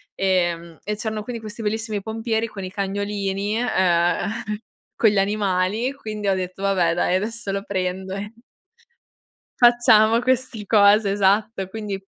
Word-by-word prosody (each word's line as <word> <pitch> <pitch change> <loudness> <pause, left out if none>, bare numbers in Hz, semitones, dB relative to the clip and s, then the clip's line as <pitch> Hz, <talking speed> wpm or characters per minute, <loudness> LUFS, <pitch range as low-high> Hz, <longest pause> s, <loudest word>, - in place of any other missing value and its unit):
ehm, 175 -3 0
e 210 - -3
c'erano 215 0 -4
quindi 235 0 -6
questi 215 +1 -8
bellissimi 215 -1 -2
pompieri, 225 +1 -2
con 200 -3 -8
i 185 - -6
cagnolini, 200 +1 -2
ehm, 180 -7 +2 0.7
con 220 - +5
gli 205 - -1
animali 200 +3 0
quindi 215 -7 -4
ho 195 - +2
detto 185 +1 -5
vabbè 185 -4 +2
dai 175 +1 +1
adesso 215 +1 -3
lo 195 0 -3
prendo 190 0 -3
e 205 +1 -6 1.3
Facciamo 235 -2 +5
questi 250 -3 -1
cose 205 0 +5
esatto 200 0 +1
quindi 210 -1 -4
205 Hz, 140 wpm, -22 LUFS, 190-220 Hz, 1.3 s, con